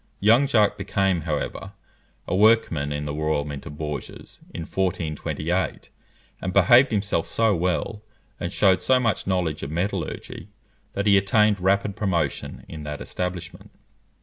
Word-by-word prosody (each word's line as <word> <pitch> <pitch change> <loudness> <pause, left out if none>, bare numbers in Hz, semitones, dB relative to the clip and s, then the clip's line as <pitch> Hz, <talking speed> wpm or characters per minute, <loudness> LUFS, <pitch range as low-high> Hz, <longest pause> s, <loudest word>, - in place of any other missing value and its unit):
Young 115 +7 +5
Jacques 105 -5 +2
became, 95 -3 0
however, 75 -1 -3 0.5
a - - -1
workman 95 -9 +3
in 75 0 -3
the 75 - -3
Royal 75 -1 -1
Mint 70 -2 -7
of 75 - -9
Bourges, 75 -3 -7
in - - -6
1428, 85 0 -2 0.5
and 95 - -2
behaved 120 +9 +6
himself 100 -5 -1
so 115 -3 +2
well, 90 +5 -1 0.4
and - - -3
shewed 95 -2 +3
so 130 -1 +3
much 115 -7 -1
knowledge 90 -5 -1
of - - -5
metallurgy, 90 +3 -4 0.5
that 100 - -2
he 100 -1 +6
attained 105 +1 +3
rapid 100 +2 +1
promotion 95 -5 -2
in 80 - -8
that 75 -1 -6
establishment. 90 -1 -5
95 Hz, 145 wpm, -24 LUFS, 80-105 Hz, 0.5 s, behaved